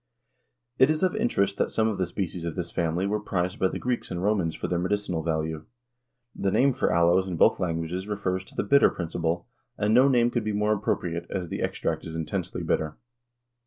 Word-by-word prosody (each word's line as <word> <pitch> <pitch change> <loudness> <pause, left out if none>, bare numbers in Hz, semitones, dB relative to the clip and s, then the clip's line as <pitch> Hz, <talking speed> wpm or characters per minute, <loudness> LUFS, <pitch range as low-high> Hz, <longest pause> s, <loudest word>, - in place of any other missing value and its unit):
It 130 - +6
is 155 +3 +1
of 185 +2 +2
interest 215 - +1
that - - +2
some 110 0 +1
of 105 -4 -2
the 95 - +1
species 90 -1 -4
of 85 -2 -3
this 85 -2 -4
family 85 +2 0
were 105 +2 0
prized 90 -2 -2
by 95 - +3
the - - -4
Greeks 125 -1 -2
and 90 0 -4
Romans 95 -6 +1
for - - -4
their 90 - 0
medicinal 90 -2 -1
value. 80 -1 -2 0.7
The 100 - 0
name 135 +7 +3
for 130 - 0
aloes 85 +3 +3
in 90 -3 -3
both - - +4
languages 85 +2 -2
refers 95 -3 -2
to - - -16
the - - 0
bitter 140 +7 +5
principle, 85 0 -2 0.3
and 105 +1 +1
no 130 +3 +6
name 120 -3 +3
could 120 -2 -1
be 105 0 -2
more 105 +1 +2
appropriate, 85 -4 -2
as 90 -3 -3
the - - -4
extract - - -2
is 80 -1 -7
intensely 80 -2 -3
bitter. 80 -1 -1
95 Hz, 210 wpm, -26 LUFS, 85-105 Hz, 0.7 s, It